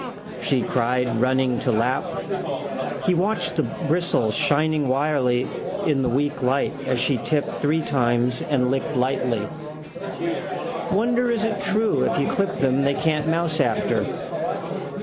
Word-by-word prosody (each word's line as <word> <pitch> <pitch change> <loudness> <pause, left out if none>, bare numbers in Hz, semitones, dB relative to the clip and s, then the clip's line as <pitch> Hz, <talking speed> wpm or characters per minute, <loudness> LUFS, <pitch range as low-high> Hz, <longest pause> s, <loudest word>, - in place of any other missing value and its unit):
she 130 -3 +1
cried, 125 -1 +1
running 130 -1 +2
to 125 - 0
lap. 120 +4 +1 1.0
He 185 - +3
watched 185 +2 0
the 155 - +2
bristles 155 -9 0
shining 150 0 +2
wirily 130 -2 +2 0.4
in 145 -3 +2
the 125 - +1
weak 145 +4 0
light 130 +2 +1
as 130 -2 +1
she 130 0 +1
tipped 150 +3 -1
three 155 +2 +1
times 125 -2 +1
and 125 -3 +1
licked 135 +3 -1
lightly. 125 -4 0 1.4
Wonder 240 +4 +2
is 230 -2 +1
it 220 -3 -1
true 215 +2 +2
if - - 0
you 140 - +1
clip 195 -1 0
them 135 0 +2
they 140 0 +2
can't 155 0 0
mouse 165 -1 +1
after. - - +1
140 Hz, 140 wpm, -23 LUFS, 125-160 Hz, 1.4 s, He